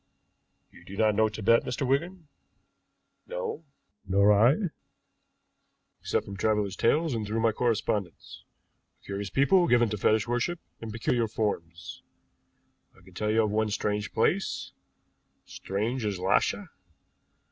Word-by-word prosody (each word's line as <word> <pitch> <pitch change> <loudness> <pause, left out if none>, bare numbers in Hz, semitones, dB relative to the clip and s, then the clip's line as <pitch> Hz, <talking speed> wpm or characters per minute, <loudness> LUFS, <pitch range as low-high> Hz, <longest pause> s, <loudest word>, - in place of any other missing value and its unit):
You - - -17
do 100 +3 -10
not 110 -1 +3
know 110 +1 +3
Tibet, 110 +2 +2
Mr. 125 +2 -3
Wigan?" 165 +5 -1 1.0
"No." - - -4 0.4
"Nor 100 +2 +4
I, 130 - +3 1.3
except - - -1
from 100 -1 -8
travelers' 105 -1 0
tales 155 +5 +2
and 115 -2 -2
through 110 +2 -1
my 115 0 +3
correspondents. 105 - -2 0.6
A - - -27
curious 100 0 -4
people, 140 - +3
given 120 -4 +4
to 105 - -3
fetish 110 +2 +2
worship 120 +9 -1 0.2
in 115 - -7
peculiar 115 +1 0
forms. 85 -6 -4 1.0
I 95 - -20
can 95 0 -17
tell 105 +4 -2
you 110 +1 +3
of 105 - -1
one 110 0 +1
strange 105 0 -2
place, 175 - 0 0.7
strange 110 +6 -3
as 105 -3 -1
Lhasa. 100 - 0
110 Hz, 135 wpm, -28 LUFS, 100-125 Hz, 1.3 s, Nor